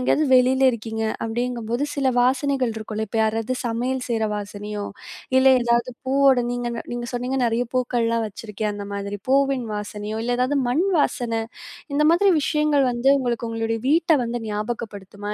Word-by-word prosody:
எங்கேயாவது 300 +4 +2
வெளில 255 +1 +4
இருக்கீங்க. 225 -1 -4 0.2
அப்பிடிங்கும்போது, 235 +1 -2
சில 270 -2 +1
வாசனைகள் 260 0 +1
இருக்கும்ல! 220 0 -4
இப்ப 225 - -2
யாராவது 225 +3 0
சமையல் 245 +3 -1
செய்ற 225 -2 0
வாசனையோ! 205 0 -5 0.5
இல்ல 260 - +5 0.2
ஏதாவது 235 +1 +1
பூவோட 270 -1 +4
நீங்க 245 0 -2 0.2
நீங்க 240 0 -4
சொன்னீங்க, 250 +2 -2
"நிறைய 235 +2 0
பூக்கள்லாம் 230 -2 +1
வச்சுருக்கேன்." 210 0 -4
அந்த 200 -1 -6
மாதிரி 200 0 -4
பூவின் 275 -2 +2
வாசனையோ, 210 +1 -5
இல்ல 245 0 0
எதாவது 260 +3 +1
மண் 290 +9 +2
வாசனை, 230 -5 0 0.5
இந்த 300 +1 +3
மாதிரி 390 +3 +4
விஷயங்கள் 295 -3 +2
வந்து 240 +2 +1
உங்களுக்கு 240 -2 -2
உங்களுடைய 225 0 -2
வீட்ட 330 +2 +3
வந்து 240 +1 -3
ஞாபகப்படுத்துமா? 210 -2 -5
240 Hz, 150 wpm, -23 LUFS, 220-260 Hz, 0.5 s, இல்ல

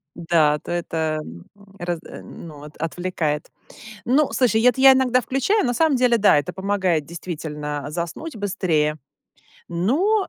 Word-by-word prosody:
Да, 165 -3 +2
то - - -8
это, 160 -2 -2
м, 85 +1 -12 0.3
разд 175 -1 -4
а, - - -10
ну, 150 -4 -11
от 150 0 -12
отвлекает. 165 -2 -3 0.6
Ну, 275 +4 +2
слушай, 225 -4 +2
это 250 +1 +3
я 270 0 +9
иногда 255 -1 +3
включаю. 270 - 0
На 245 - 0
самом 315 -2 +3
деле, 245 -2 +3
да, 200 -7 +5
это 145 - -3
помогает 190 -5 0
действительно 150 -3 -6
заснуть 175 - -5
быстрее. 175 -7 0 0.7
Но, 310 - +1
175 Hz, 145 wpm, -22 LUFS, 155-250 Hz, 0.7 s, я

